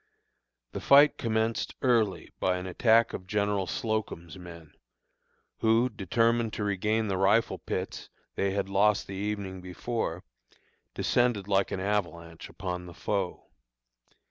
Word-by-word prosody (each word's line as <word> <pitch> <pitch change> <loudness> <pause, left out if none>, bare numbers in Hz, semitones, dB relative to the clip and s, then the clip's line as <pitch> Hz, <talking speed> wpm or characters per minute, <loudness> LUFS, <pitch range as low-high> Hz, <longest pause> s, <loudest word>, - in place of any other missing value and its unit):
The - - -5
fight 145 +2 +6
commenced 110 0 -1
early 115 -6 +1
by 90 -1 +1
an 90 - -6
attack 115 +5 +3
of 90 - -6
General 100 -1 0
Slocum's 105 -8 -3
men, 85 -4 -11 0.9
who, 115 +3 +3
determined 115 +2 +1
to 105 - -3
regain 105 +2 0
the 95 -2 -1
rifle 100 +4 +2
pits - - -5 0.2
they 100 - 0
had 95 0 -1
lost 100 +1 +2
the 95 - -8
evening 100 -2 -4
before, 90 -1 -4 0.7
descended 120 -5 +1
like 100 -1 +2
an - - -3
avalanche 85 -5 -3
upon 90 -1 -5
the 85 - -11
foe. 100 -4 -3
100 Hz, 130 wpm, -28 LUFS, 95-110 Hz, 0.9 s, fight